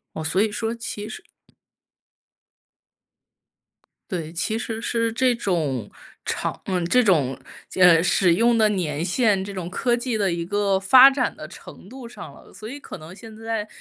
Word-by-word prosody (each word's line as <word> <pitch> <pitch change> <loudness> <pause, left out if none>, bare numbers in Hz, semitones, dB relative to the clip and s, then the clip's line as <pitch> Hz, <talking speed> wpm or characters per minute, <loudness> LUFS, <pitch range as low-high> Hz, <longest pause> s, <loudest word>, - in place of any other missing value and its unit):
哦。 160 - -5
所 185 +4 0
以 215 +1 +2
说 225 +2 -3
其 215 -2 -6
实。 220 - -9 2.9
对， 165 -4 -4
其 180 +6 -2
实 225 -1 -5
是 230 -1 -1
这 255 +1 +2
种 155 - -2 0.3
长 - - -3
嗯， 180 -2 -1
这 250 +7 +4
种 145 - +2 0.3
间 180 -1 +4
嗯， 165 0 +5
使 180 -2 +3
用 230 +5 +3
的 215 -1 +4
年 165 -7 -2
限， 200 0 +1
这 200 0 -8
种 180 -2 -5
科 240 +6 0
技 240 -2 -3
的 195 -3 +1
一 170 0 -3
个 200 +1 0
发 255 +7 +8
展 270 -2 -1
的 155 - -9
程 185 - -13
度 255 +1 -10
上 - - -10
了。 - - -17
所 215 - -10
以 280 +4 -7
可 275 - -10
能 155 +3 -11
现 225 0 -12
在 225 -1 -4
205 Hz, 185 characters per minute, -23 LUFS, 175-230 Hz, 2.9 s, 发